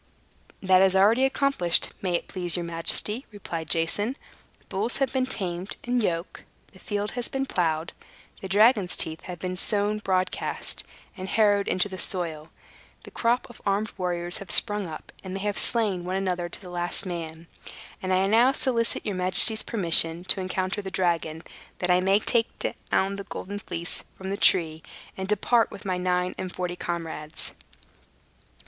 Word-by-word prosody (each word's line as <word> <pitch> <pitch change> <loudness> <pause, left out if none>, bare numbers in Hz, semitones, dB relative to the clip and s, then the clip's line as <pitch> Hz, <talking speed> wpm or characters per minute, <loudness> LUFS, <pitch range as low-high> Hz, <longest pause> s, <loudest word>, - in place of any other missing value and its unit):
"That 185 -1 +5
is 190 0 +4
already 220 +7 +4
accomplished, 270 -11 +1
may 180 -2 -1
it - - -3
please 175 -3 0
your 175 - -3
majesty," 170 +8 +1
replied 170 -6 -6
Jason. 205 - 0 0.4
"The - - -32
bulls 205 +5 -1
have 270 -2 -1
been 260 -1 0
tamed 185 -5 -4
and 245 0 0
yoked; 170 -3 -3 0.3
the - - -17
field 205 -1 -3
has 245 -1 -3
been 270 0 -3
plowed; 165 -7 -1 0.5
the 190 - -5
dragon's 205 -1 +4
teeth 160 0 -2
have 180 -1 -7
been 185 +1 -4
sown 205 +2 +1
broadcast, 185 -2 -2 0.3
and 190 -1 -7
harrowed 205 -2 +2
into 185 +2 +1
the 190 -2 -8
soil; 165 -4 -3 0.5
the - - -12
crop 240 +1 0
of 240 - -15
armed 205 +2 -1
warriors 175 -1 -2
have 195 - -10
sprung 205 -3 +3
up, 155 -1 -9
and 190 -1 -6
they 195 - -4
have 205 0 -1
slain 210 -7 +1
one 180 +1 -3
another, 180 -2 -2
to - - -6
the 180 -2 -11
last 175 +2 -2
man. 165 -2 -6 0.6
And 185 - -4 0.2
now 235 +4 +5
I - - 0
solicit 235 -4 0
your 205 - -2
majesty's 185 +4 +7
permission 170 -5 +6
to 190 +1 +3
encounter 185 +2 -2
the 195 - -6
dragon, 165 -3 -1 0.3
that 180 0 0
I 180 - +4
may 195 +2 +3
take 230 +2 +1 0.4
down 195 +1 0
the 200 - -6
Golden 200 +2 -6
Fleece 170 -3 -4 0.2
from 190 0 -6
the 200 - -2
tree, 160 -6 +3 0.3
and 190 0 -5
depart, 225 +3 +2
with - - -11
my 185 -2 -1
nine 180 0 0
and 185 -1 -4
forty 180 -1 -4
comrades." 165 -3 -5
190 Hz, 175 wpm, -25 LUFS, 175-210 Hz, 0.6 s, majesty's